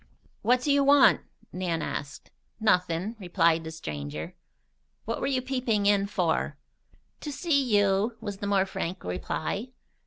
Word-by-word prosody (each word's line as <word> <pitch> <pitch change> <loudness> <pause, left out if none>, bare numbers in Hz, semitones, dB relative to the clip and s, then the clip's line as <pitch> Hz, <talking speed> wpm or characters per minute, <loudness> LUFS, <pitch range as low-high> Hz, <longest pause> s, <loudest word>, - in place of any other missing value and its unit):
"What 245 +3 +3
do 290 - +2
you 280 0 +4
want?" 280 0 +6 0.3
Nan 175 -3 -2
asked. 140 -3 -6 0.3
"Nothin'," 180 0 +1
replied 170 -3 +2
the 160 - -6
stranger. 75 - -6 0.7
"What 230 - -2
were - - 0
you 260 -2 0
peeping 250 -6 0
in 200 -1 +3
for?" 180 -5 0 0.6
"To 295 - -5
see 285 -2 +1
you," 205 +3 +2
was 205 -3 -5
the 200 - -4
more 195 -1 +3
frank 185 -1 -4
reply. 155 - -3
200 Hz, 145 wpm, -27 LUFS, 165-240 Hz, 0.7 s, want